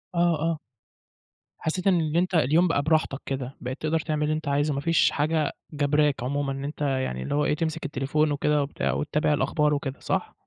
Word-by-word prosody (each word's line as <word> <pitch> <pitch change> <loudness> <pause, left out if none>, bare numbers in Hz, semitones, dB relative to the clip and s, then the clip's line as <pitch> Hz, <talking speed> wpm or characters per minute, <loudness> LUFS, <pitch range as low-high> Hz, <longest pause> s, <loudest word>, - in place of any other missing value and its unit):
آه، 170 -3 +3
آه. 165 -1 0 1.0
حسّيت 180 +4 -2
إن 180 -3 +4
اللي 160 +1 0
أنت 180 +1 0
اليوم 160 +4 +4
بقى 145 -4 +1
براحتك 155 -3 +1
كده. 135 -1 -4
بقيت 130 +1 -5
تقدر 160 +1 0
تعمل 150 -1 -2
اللي 155 +1 +1
أنت 155 -2 -5
عايزه، 145 +1 +1
ما 140 - -1
فيش 165 +1 +3
حاجة 155 0 0 0.2
جَبراك 145 -3 +1
عمومًا 140 +1 -1
إن 135 +1 -5
أنت 150 +1 -6
يعني 130 - -1
اللي 145 - -3
هو 150 0 +2
إيه، 150 - +2
تمسك 160 0 -2
التليفون 145 +2 0
وكده 150 0 +1
وبتاع 140 - -2
وتتابع 150 0 0
الأخبار 150 +2 +1
وكده. 140 -1 -4
صح؟ - - -2
150 Hz, 200 wpm, -26 LUFS, 140-160 Hz, 1.0 s, إن